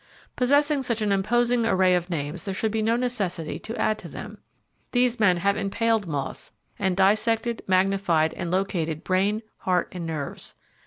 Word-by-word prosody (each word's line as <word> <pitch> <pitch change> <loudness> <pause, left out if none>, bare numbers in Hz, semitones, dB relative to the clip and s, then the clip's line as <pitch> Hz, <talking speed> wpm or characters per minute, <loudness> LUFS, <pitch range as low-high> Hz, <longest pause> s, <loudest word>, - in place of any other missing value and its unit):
Possessing 285 +3 +3
such 235 -4 -1
an 210 - +1
imposing 235 +5 +2
array 190 -4 +3
of 180 0 0
names 155 +1 -3
there 195 -2 -3
should 220 +2 0
be 220 0 0
no 225 +2 +2
necessity 205 -10 -2
to 225 - -6
add 215 0 +1
to - - -9
them. - - -8 0.5
These 245 -1 +2
men 185 -5 +4
have 200 +3 +1
impaled 220 0 0
moths 145 -4 -4 0.3
and 190 -2 0
dissected, 220 +4 +2
magnified 185 -4 +2
and 170 - -4
located 170 -4 -1
brain, 200 +4 +1
heart 180 -2 0
and 175 -2 -5
nerves. 150 -4 -4
195 Hz, 165 wpm, -25 LUFS, 180-230 Hz, 0.5 s, men